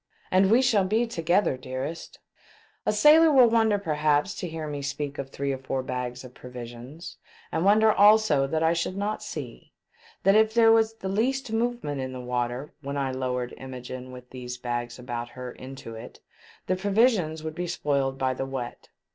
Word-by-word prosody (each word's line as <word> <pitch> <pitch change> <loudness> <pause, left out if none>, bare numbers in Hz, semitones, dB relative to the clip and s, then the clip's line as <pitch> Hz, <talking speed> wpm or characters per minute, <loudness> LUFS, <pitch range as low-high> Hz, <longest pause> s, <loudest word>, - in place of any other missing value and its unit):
And 190 +1 +4
we 240 +5 +5
shall 220 -6 +3
be 220 +5 +1
together, 175 - +1
dearest 130 +5 -6 0.3
!" - - -31
A - - +4
sailor 315 +2 +6
will 255 -4 +7
wonder 220 -2 +3
perhaps 150 -2 +1
to 180 - -4
hear 160 -1 -5
me 145 -1 -4
speak 145 +1 -4
of 135 -1 -4
three 140 0 -3
or 135 - -5
four 130 0 -3
bags 125 -1 -4
of 125 -1 -12
provisions, 125 +6 -9 0.3
and 160 - 0
wonder 215 +2 +5
also 205 -9 +5
that 160 +3 -1
I 160 +1 +4
should 170 +3 -2
not 205 +2 -2
see - - -8 0.5
that 195 - +5
if 220 +1 +4
there 225 -1 +6
was 225 0 +3
the 195 - -6
least 235 +5 0
movement 225 - -1
in 130 0 -5
the 130 - -6
water 125 +2 -3
when 140 0 -4
I 135 -1 -1
lowered 125 -1 -3
Imogene 130 -1 -8
with 125 0 -12
these 125 -1 -6
bags 120 -1 -4
about 120 -1 -5
her 125 0 -7
into 130 -3 -9
it, 115 +2 -10 0.5
the 185 - +1
provisions 195 -5 +2
would 160 0 -4
be 175 +2 -4
spoiled 140 -5 -1
by 130 -1 0
the 135 +1 -4
wet. 130 -3 -6
145 Hz, 190 wpm, -26 LUFS, 130-205 Hz, 0.5 s, will